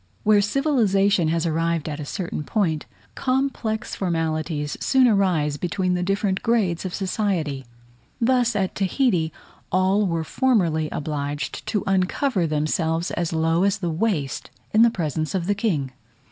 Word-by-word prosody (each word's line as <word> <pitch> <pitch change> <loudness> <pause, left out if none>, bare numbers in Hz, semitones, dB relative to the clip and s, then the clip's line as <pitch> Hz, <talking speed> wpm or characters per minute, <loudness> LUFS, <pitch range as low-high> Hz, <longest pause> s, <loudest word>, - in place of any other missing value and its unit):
Where 210 -1 +5
civilization 205 - +2
has 165 +1 0
arrived 165 -1 0
at 150 -1 -4
a 150 - -5
certain 170 -1 -4
point, 160 -4 -1 0.3
complex 255 -4 -1
formalities 160 -4 -2
soon 260 -2 +4
arise 180 -9 +2
between 180 +3 -1
the 180 - 0
different 195 +1 0
grades 200 -7 +1
of 185 - -4
society: 180 - -2 0.5
thus 245 -1 +2
at 195 -2 0
Tahiti 190 - +1 0.4
all 190 +3 +2
were 165 -2 -1
formerly 170 - +1
obliged 145 -1 -4
to 210 -3 0
uncover 190 - +1
themselves 160 +2 0
as 170 -2 -2
low 165 +1 +1
as 200 0 +2
the 175 -5 -2
waist 160 -6 -1 0.2
in 230 +2 +6
presence 155 - -2
of 180 -3 -1
the 205 - +2
king. 175 - -1
180 Hz, 140 wpm, -23 LUFS, 160-210 Hz, 0.5 s, in